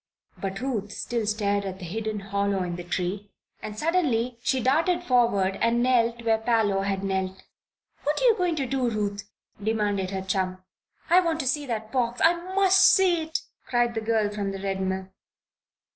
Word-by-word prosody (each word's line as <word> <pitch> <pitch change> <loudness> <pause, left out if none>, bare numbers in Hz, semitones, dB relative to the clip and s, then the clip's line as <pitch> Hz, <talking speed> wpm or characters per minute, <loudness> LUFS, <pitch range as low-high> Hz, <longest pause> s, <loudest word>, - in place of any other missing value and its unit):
But 195 0 -4
Ruth 220 -6 -2
still 230 0 -3
stared 205 -1 0
at 190 -1 -5
the 185 - -8
hidden 215 +3 -3
hollow 200 -1 -1
in 175 -1 -3
the 175 - -6
tree 185 +3 -3 0.3
and 210 0 -7
suddenly 255 -7 0
she 260 +1 +1
darted 330 +8 +2
forward 230 - +2
and 235 +1 +2
knelt 235 -2 +2
where 225 -1 +2
Parloe 220 -4 +1
had 195 0 -2
knelt. 190 -1 -2 0.6
"What 295 +1 0
are - - -2
you 475 -3 +6
going 360 -4 0
to 280 -3 -1
do, 260 -1 0
Ruth?" 205 -2 -3 0.3
demanded 205 -3 0
her 190 -1 -4
chum. 185 -1 -2 0.5
"I 355 - +8
want 335 -3 0
to 265 - -3
see 290 +2 0
that 220 -2 -4
box 245 -2 0
I 330 - +6 0.2
must 385 -1 +5
see 370 -3 +5
it!" 320 0 -3 0.3
cried 240 -1 +1
the 225 - -2
girl 220 -2 +1
from 205 -1 -3
the 195 0 -5
Red 195 0 -2
Mill. 190 0 -2
220 Hz, 185 wpm, -26 LUFS, 195-255 Hz, 0.6 s, I